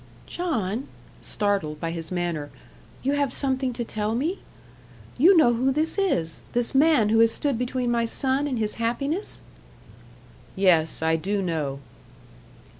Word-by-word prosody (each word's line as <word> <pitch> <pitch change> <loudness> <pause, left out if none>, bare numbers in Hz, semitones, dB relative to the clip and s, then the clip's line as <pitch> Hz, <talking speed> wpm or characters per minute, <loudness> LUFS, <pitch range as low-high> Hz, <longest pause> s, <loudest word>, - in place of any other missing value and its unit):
"John," 245 - -2 0.3
startled 195 -8 -1
by 165 +1 -3
his 165 0 -4
manner 170 -5 -2 0.5
"you 275 +2 +1
have 285 -2 0
something 260 -1 -1
to 235 0 -4
tell 215 0 -2
me? 320 +10 -1 0.8
You 345 +8 +6
know 245 -7 +5
who 255 +3 +1
this 310 +4 0
is 170 - 0
this 240 +1 +1
man 275 -6 +4
who 225 +1 +3
has 230 0 +6
stood 280 +3 0
between 250 +1 -1
my 235 -1 +1
son 265 +4 +1
and 260 -4 -2
his 215 -1 -1
happiness?" 280 - -1 1.1
"Yes, 170 -5 +2
I 160 0 +2
do 200 +5 -2
know." 150 -6 -3
230 Hz, 145 wpm, -25 LUFS, 185-275 Hz, 1.1 s, You